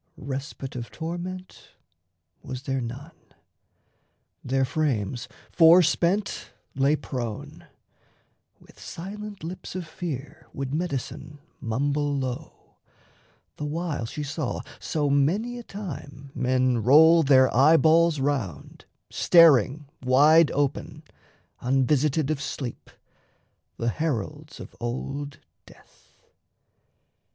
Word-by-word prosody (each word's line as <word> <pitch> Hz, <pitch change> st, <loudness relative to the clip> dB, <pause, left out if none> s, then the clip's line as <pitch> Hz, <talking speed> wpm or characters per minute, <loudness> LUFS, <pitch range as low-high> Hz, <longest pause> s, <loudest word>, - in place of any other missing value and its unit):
Respite 135 Hz, 0 st, -6 dB
of 120 Hz, -3 st, -5 dB
torment 175 Hz, -, -7 dB, 0.7 s
was 130 Hz, 0 st, -7 dB
there 135 Hz, -1 st, -2 dB
none. 130 Hz, +7 st, -7 dB, 1.3 s
Their 135 Hz, +1 st, +1 dB
frames 125 Hz, -5 st, -1 dB, 0.2 s
Forspent 175 Hz, +3 st, +4 dB, 0.2 s
lay 140 Hz, +3 st, +2 dB
prone. 120 Hz, -7 st, -6 dB, 0.9 s
With -, -, -20 dB
silent 205 Hz, +2 st, -8 dB
lips 175 Hz, +2 st, -7 dB
of 185 Hz, -2 st, -4 dB
fear 155 Hz, -5 st, -7 dB
Would 135 Hz, 0 st, -4 dB
Medicine 150 Hz, -2 st, -4 dB, 0.2 s
mumble 145 Hz, +5 st, -1 dB
low, 130 Hz, -2 st, -6 dB, 0.8 s
the 150 Hz, -, -4 dB
while 150 Hz, -5 st, -3 dB
she 150 Hz, -, -5 dB
saw 145 Hz, -2 st, -3 dB, 0.2 s
So 150 Hz, -2 st, -1 dB
many 185 Hz, -, +1 dB
a -, -, -9 dB
time 140 Hz, -, -8 dB
men 130 Hz, -1 st, +1 dB
roll 160 Hz, +8 st, +7 dB
their 130 Hz, -3 st, +4 dB
eyeballs 160 Hz, +3 st, +5 dB
round, 135 Hz, -, -3 dB, 0.3 s
Staring 150 Hz, -, +5 dB, 0.2 s
wide 150 Hz, +5 st, +6 dB
open, 145 Hz, +2 st, -2 dB, 0.6 s
unvisited 135 Hz, +3 st, +1 dB
of 150 Hz, -2 st, -2 dB
sleep, 130 Hz, -4 st, -6 dB, 0.9 s
The 115 Hz, -, 0 dB
heralds 150 Hz, +2 st, -4 dB
of -, -, -10 dB
old 140 Hz, +4 st, -5 dB, 0.3 s
death. -, -, -22 dB
145 Hz, 95 wpm, -25 LUFS, 130-160 Hz, 1.3 s, roll